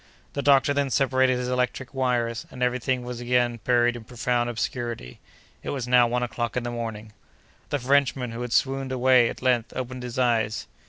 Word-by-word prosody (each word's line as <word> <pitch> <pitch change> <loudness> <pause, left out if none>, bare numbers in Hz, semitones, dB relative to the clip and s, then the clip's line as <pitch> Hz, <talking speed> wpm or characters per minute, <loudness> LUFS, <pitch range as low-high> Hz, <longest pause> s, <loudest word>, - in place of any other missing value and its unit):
The 140 - -2
doctor 140 0 +4
then 140 -1 0
separated 130 -1 +2
his 125 0 -3
electric 125 +1 -2
wires, 120 -4 -1
and 125 -1 -5
every 125 0 +1
thing 125 0 -1
was 120 -1 -6
again 120 -1 +1
buried 120 -1 +3
in 120 - -8
profound 120 +1 -1
obscurity. 120 - -4 0.4
It - - -6
was 130 -4 -3
now 125 -1 +5
one 125 +1 -1
o'clock 120 0 -3
in 125 - -1
the 120 - -3
morning. 110 -2 -6 0.6
The 145 - 0
Frenchman, 135 -2 +1
who 115 +1 -6
had 125 -1 -4
swooned 135 +1 +1
away, 130 -1 +4
at - - -8
length 125 -2 +1
opened 130 0 -4
his 125 +1 -6
eyes. 115 -4 +1
125 Hz, 195 wpm, -25 LUFS, 120-130 Hz, 0.6 s, now